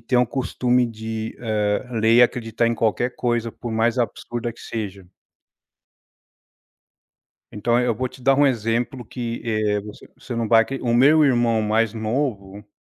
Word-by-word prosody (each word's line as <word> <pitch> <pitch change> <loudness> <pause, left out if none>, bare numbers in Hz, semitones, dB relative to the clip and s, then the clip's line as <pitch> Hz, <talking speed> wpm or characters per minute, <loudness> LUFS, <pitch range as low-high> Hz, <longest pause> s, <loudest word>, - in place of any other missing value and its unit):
têm 125 - +2
o 125 - +3
costume 125 -1 0
de, 110 -1 -5
eh, 105 -1 -1
ler 115 0 +3
e 120 - +8
acreditar 115 -1 +1
em 115 - +1
qualquer 115 +2 0
coisa, 120 -1 -1
por 120 +1 -7
mais 115 +2 +1
absurda 120 0 -3
que 115 - -17
seja. 100 -5 -6 2.4
Então 120 +3 +1
eu 125 -2 +1
vou 130 +3 -2
te 130 - -16
dar 135 +2 +4
um 145 +1 +4
exemplo 120 +1 -1
que, 115 +1 -5
eh, 110 -2 0
você 105 +1 -12
você 125 - -7
não 115 -1 -2
vai 115 0 +6
acre 135 +4 -5
o 120 - 0
meu 145 +6 +5
irmão 120 -4 +2
mais 110 +1 +1
novo 110 -4 -3
115 Hz, 165 wpm, -22 LUFS, 110-125 Hz, 2.4 s, e